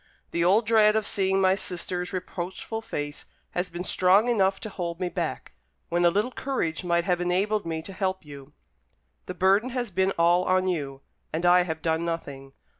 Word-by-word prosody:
The 170 - 0
old 200 +6 +4
dread 215 -1 +5
of 220 -1 +1
seeing 190 -1 +1
my 190 -1 +4
sister's 180 -1 -3
reproachful 185 +4 -5
face 145 -8 -5 0.3
has 180 +1 -2
been 175 +1 -5
strong 190 +5 +3
enough 195 -4 +2
to 215 - -5
hold 170 -3 -5
me 180 -1 -1
back, - - -4 0.4
when 175 +1 +2
a - - +7
little 210 +8 0
courage 220 - -2
might 170 -1 +1
have 180 0 0
enabled 190 +3 0
me 160 -1 -3
to 195 - -8
help 190 -2 -2
you. 140 -1 -12 0.7
The 180 - -5
burden 195 +6 +3
has 245 -4 -3
been 190 +1 +1
all 175 +2 +4
on 185 0 +2
you, 140 -6 -3 0.3
and 165 +3 -2
I 180 +1 +6
have 160 0 -4
done 160 0 0
nothing. 140 -5 -5
180 Hz, 190 wpm, -26 LUFS, 170-195 Hz, 0.7 s, a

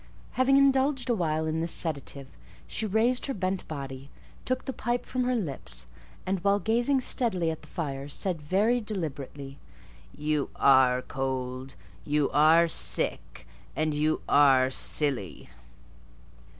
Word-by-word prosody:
Having 265 +1 +3
indulged 270 -1 +2
a - - +3
while 160 -6 -1
in 160 +1 -1
this 165 0 -1
sedative, 140 -3 -1 0.4
she 220 - -3
raised 230 +6 +1
her 275 - -3
bent 185 -1 -2
body, 135 -2 -7 0.4
took 255 0 -1
the 265 - -4
pipe 240 0 -2
from 255 -1 -2
her 250 0 +1
lips, 130 - -3 0.4
and 190 0 -1
while 200 0 +3
gazing 240 +6 +1
steadily 190 -10 +1
at 160 - -7
the 150 - -16
fire, 140 -5 -5
said 165 +3 -3
very 210 +10 +1
deliberately— 145 - -6 0.6
"You 150 -1 -1
are 130 -2 +4
cold; 130 -1 -4 0.3
you 150 -1 0
are 160 +3 +5
sick; - - -1 0.3
and 155 0 0
you 155 +1 0
are 135 -2 +5
silly." 130 - -1
160 Hz, 135 wpm, -27 LUFS, 140-220 Hz, 0.6 s, are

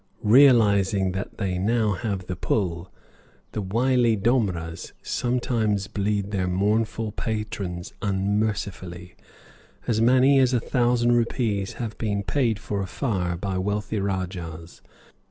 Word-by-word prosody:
Realizing 105 -6 +5
that 95 +2 -5
they 95 -4 -2
now 110 +2 +1
have 100 -2 -3
the 90 - -4
pull, 90 -2 -2 0.6
the 105 - -3
wily 120 +3 +2
domras 95 -7 -1
sometimes 115 -5 0
bleed 100 0 -2
their 95 -3 -1
mournful 110 +4 0
patrons 105 -5 -4
unmercifully. 95 -3 -2 0.7
As 110 -2 +1
many 130 +3 +5
as 130 -1 +3
a - - +3
thousand 120 0 +1
rupees 115 -4 0
have 115 -3 -5
been 100 -3 -1
paid 120 -3 +1
for 105 -1 -3
a 95 - -3
fire 90 -8 -2
by 95 0 -2
wealthy 105 +2 -2
rajahs. 90 -4 -4
105 Hz, 120 wpm, -24 LUFS, 95-115 Hz, 0.7 s, Realizing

